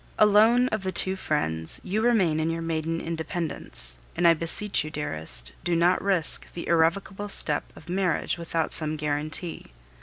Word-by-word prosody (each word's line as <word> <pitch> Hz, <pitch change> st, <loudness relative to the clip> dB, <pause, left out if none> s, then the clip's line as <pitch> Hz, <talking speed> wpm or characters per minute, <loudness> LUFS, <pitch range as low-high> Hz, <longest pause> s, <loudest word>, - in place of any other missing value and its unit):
Alone 220 Hz, +4 st, +5 dB
of 215 Hz, -3 st, -2 dB
the 190 Hz, -1 st, -3 dB
two 190 Hz, 0 st, +3 dB
friends, 80 Hz, -, -1 dB
you 205 Hz, +4 st, -2 dB
remain 195 Hz, -10 st, +2 dB
in 160 Hz, +1 st, 0 dB
your 165 Hz, 0 st, -3 dB
maiden 165 Hz, 0 st, -2 dB
independence; 160 Hz, -, -2 dB, 0.2 s
and 175 Hz, 0 st, +3 dB
I 170 Hz, -, +7 dB
beseech 165 Hz, +4 st, +1 dB
you, 155 Hz, -, -6 dB
dearest, 80 Hz, -, -2 dB
do 175 Hz, -1 st, 0 dB
not 175 Hz, +2 st, +2 dB
risk 190 Hz, -5 st, +1 dB
the 170 Hz, -, -7 dB
irrevocable 190 Hz, +5 st, 0 dB
step 150 Hz, -6 st, +1 dB
of 155 Hz, -, -15 dB
marriage 180 Hz, -2 st, -1 dB
without 165 Hz, -1 st, -3 dB
some 155 Hz, -1 st, +1 dB
guarantee. 150 Hz, +3 st, -2 dB
165 Hz, 160 wpm, -25 LUFS, 155-190 Hz, 0.2 s, I